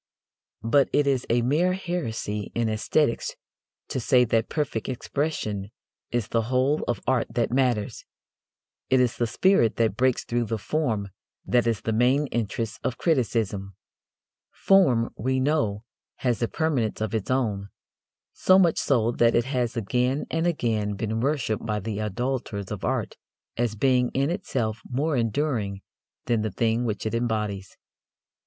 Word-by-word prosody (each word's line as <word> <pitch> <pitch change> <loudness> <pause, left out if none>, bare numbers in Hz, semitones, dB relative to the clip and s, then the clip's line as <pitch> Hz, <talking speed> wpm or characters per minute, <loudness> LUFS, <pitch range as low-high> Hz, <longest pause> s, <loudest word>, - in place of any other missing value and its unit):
But 130 +5 +3
it 145 - +3
is 135 -3 0
a 120 +1 +2
mere 160 +9 +2
heresy 115 - -3
in 115 -1 +1
æsthetics 115 +4 0 0.6
to - - -2
say 125 +1 +4
that 115 0 +1
perfect 135 -8 -2
expression 120 -7 -2 0.4
is 120 -3 -2
the 115 - +1
whole 130 +5 +1
of 120 - -1
art 130 -3 +1
that 120 -1 +1
matters. 125 -5 0 0.9
It 130 - +4
is 125 -2 +2
the 120 - +1
spirit 120 - +3
that 110 -3 +1
breaks 130 0 +2
through 120 0 -1
the 115 0 -2
form 110 -5 -1 0.4
that 120 -1 +2
is 115 -3 0
the 110 - -1
main 125 +6 +3
interest 115 -1 -2
of 125 - -2
criticism. 110 - 0 0.7
Form, 135 -13 +3
we 130 +3 0
know, 130 -7 0 0.3
has 120 -3 -1
a 115 - +2
permanence 140 -9 -1
of 110 -1 -2
its 110 -3 -2
own: 105 -7 0 0.6
so 185 - +4
much 175 -4 +4
so 120 -4 +2
that 120 -1 +3
it 120 - +3
has 125 -3 -1
again 125 +6 0
and 165 +1 +1
again 110 -10 0
been 110 +2 -2
worshipped 130 -5 0
by 105 -2 -1
the 105 +1 -4
idolators 105 -2 -3
of 105 - -5
art - - -2 0.4
as 115 -2 -1
being 125 +1 +2
in 140 +4 +1
itself 120 - -2
more 145 +5 0
enduring 115 -5 -1 0.4
than 120 -3 +1
the 110 - -1
thing 115 +4 0
which 105 -2 -3
it 110 - -2
embodies. 105 -5 -2
120 Hz, 155 wpm, -25 LUFS, 110-135 Hz, 0.9 s, say